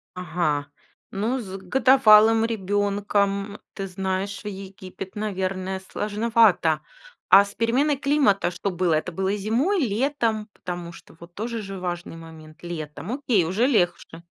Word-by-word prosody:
Ага, 155 Hz, -5 st, -1 dB, 0.4 s
ну, 225 Hz, +7 st, -1 dB
с 195 Hz, -5 st, -7 dB
годовалым 225 Hz, 0 st, +5 dB
ребёнком, 205 Hz, -1 st, -1 dB
ты 195 Hz, -1 st, -5 dB
знаешь, 190 Hz, +1 st, -3 dB
в -, -, -7 dB
Египет, 190 Hz, -1 st, -8 dB
наверное, 190 Hz, -2 st, -3 dB
сложновато. 210 Hz, -6 st, +2 dB, 0.5 s
А 200 Hz, +1 st, +8 dB
с 200 Hz, -, -11 dB
переменой 260 Hz, +6 st, +1 dB
климата 275 Hz, -10 st, +2 dB
что 180 Hz, +3 st, -3 dB
было? 180 Hz, -1 st, 0 dB
Это 160 Hz, +3 st, -2 dB
было 190 Hz, +3 st, -1 dB
зимой, 245 Hz, -, +1 dB
летом? 230 Hz, -3 st, 0 dB
Потому 175 Hz, -1 st, -6 dB
что 170 Hz, -, -15 dB
вот 170 Hz, +1 st, -13 dB
тоже 230 Hz, +3 st, -4 dB
же 195 Hz, -2 st, -7 dB
важный 175 Hz, -2 st, -5 dB
момент. 160 Hz, -1 st, -13 dB
Летом. 165 Hz, +2 st, -6 dB
Окей, 250 Hz, -, +1 dB
уже 200 Hz, +9 st, +1 dB
легче. 175 Hz, -7 st, 0 dB
195 Hz, 135 wpm, -24 LUFS, 180-225 Hz, 0.5 s, А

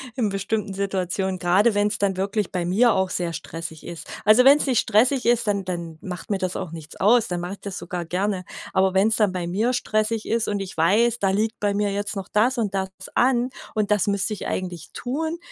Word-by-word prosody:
in 235 Hz, -5 st, 0 dB
bestimmten 200 Hz, +1 st, -2 dB
Situationen, 190 Hz, -1 st, -2 dB
gerade 195 Hz, +5 st, +3 dB
wenn's 205 Hz, +1 st, +1 dB
dann 195 Hz, -2 st, 0 dB
wirklich 200 Hz, +1 st, -1 dB
bei 180 Hz, -2 st, -2 dB
mir 220 Hz, +6 st, +4 dB
auch 190 Hz, -1 st, 0 dB
sehr 175 Hz, -2 st, -1 dB
stressig 165 Hz, 0 st, -7 dB
ist. 170 Hz, -, -8 dB, 0.2 s
Also 215 Hz, +4 st, +6 dB
wenn's 285 Hz, +2 st, +6 dB
nicht 255 Hz, -5 st, +2 dB
stressig 245 Hz, +4 st, +2 dB
ist, 240 Hz, -1 st, +3 dB
dann 200 Hz, -1 st, 0 dB
dann 170 Hz, -3 st, -5 dB
macht 180 Hz, +1 st, -7 dB
mir 200 Hz, -, 0 dB
das 185 Hz, -1 st, -2 dB
auch 170 Hz, -, -4 dB
nichts 160 Hz, -1 st, -9 dB
aus, 225 Hz, +3 st, +4 dB
dann 175 Hz, -1 st, -3 dB
mach 175 Hz, +1 st, -5 dB
ich 200 Hz, -, -7 dB
das 200 Hz, -2 st, -5 dB
sogar 175 Hz, 0 st, -4 dB
gerne. 185 Hz, +2 st, -2 dB, 0.3 s
Aber 190 Hz, 0 st, +2 dB
wenn's 210 Hz, +3 st, +4 dB
dann 210 Hz, -3 st, +3 dB
bei 180 Hz, -2 st, -3 dB
mir 210 Hz, +8 st, 0 dB
stressig 215 Hz, -2 st, -1 dB
ist 230 Hz, 0 st, 0 dB
und 205 Hz, -1 st, -1 dB
ich 195 Hz, -1 st, -6 dB
weiß: 220 Hz, +8 st, +3 dB
„Da 195 Hz, -, +2 dB
liegt 215 Hz, +4 st, 0 dB
bei 205 Hz, -1 st, 0 dB
mir 205 Hz, 0 st, 0 dB
jetzt 205 Hz, +2 st, -3 dB
noch 195 Hz, -2 st, -6 dB
das 240 Hz, +5 st, +2 dB
und 215 Hz, -4 st, -1 dB
das 190 Hz, -1 st, -1 dB, 0.2 s
an 250 Hz, 0 st, +2 dB, 0.2 s
und 210 Hz, -1 st, 0 dB
das 210 Hz, -2 st, +2 dB
müsste 200 Hz, +1 st, +1 dB
ich 205 Hz, -, -5 dB
eigentlich 180 Hz, -3 st, -4 dB
tun“, 315 Hz, +7 st, -3 dB
200 Hz, 225 wpm, -23 LUFS, 185-220 Hz, 0.3 s, Also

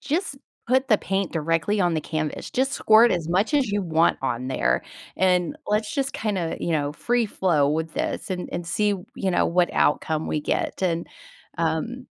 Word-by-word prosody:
just 320 Hz, -1 st, -2 dB, 0.3 s
put 260 Hz, +2 st, +2 dB
the 215 Hz, -, +5 dB
paint 195 Hz, -1 st, -1 dB
directly 165 Hz, +5 st, 0 dB
on 175 Hz, -2 st, +2 dB
the 155 Hz, -, 0 dB
canvas. 155 Hz, -1 st, -4 dB
Just 265 Hz, +2 st, 0 dB
squirt 225 Hz, -2 st, +5 dB
as 165 Hz, -2 st, -2 dB
much 195 Hz, -, +1 dB
as 265 Hz, -7 st, +2 dB
you 205 Hz, -1 st, 0 dB
want 165 Hz, -1 st, +2 dB
on 130 Hz, -1 st, -2 dB
there, 130 Hz, -, +1 dB, 0.3 s
and 180 Hz, -, +2 dB
let's 210 Hz, 0 st, 0 dB
just 275 Hz, -1 st, -1 dB
kinda," 195 Hz, -7 st, -2 dB
you 170 Hz, -, -1 dB
know, 145 Hz, -2 st, 0 dB
"free 240 Hz, +6 st, 0 dB
flow 160 Hz, -8 st, +1 dB
with 160 Hz, +1 st, -1 dB
this -, -, -3 dB
and 180 Hz, -1 st, -3 dB
and 175 Hz, -1 st, -4 dB
see, 210 Hz, +5 st, +1 dB, 0.3 s
you 190 Hz, -2 st, -1 dB
know, 175 Hz, -, +2 dB
what 175 Hz, 0 st, +2 dB
outcome 155 Hz, +1 st, +1 dB
we 150 Hz, -, -1 dB
get." 170 Hz, -, -2 dB
And, 170 Hz, -2 st, 0 dB, 0.5 s
um, 170 Hz, +11 st, -2 dB
180 Hz, 185 wpm, -24 LUFS, 160-215 Hz, 0.5 s, the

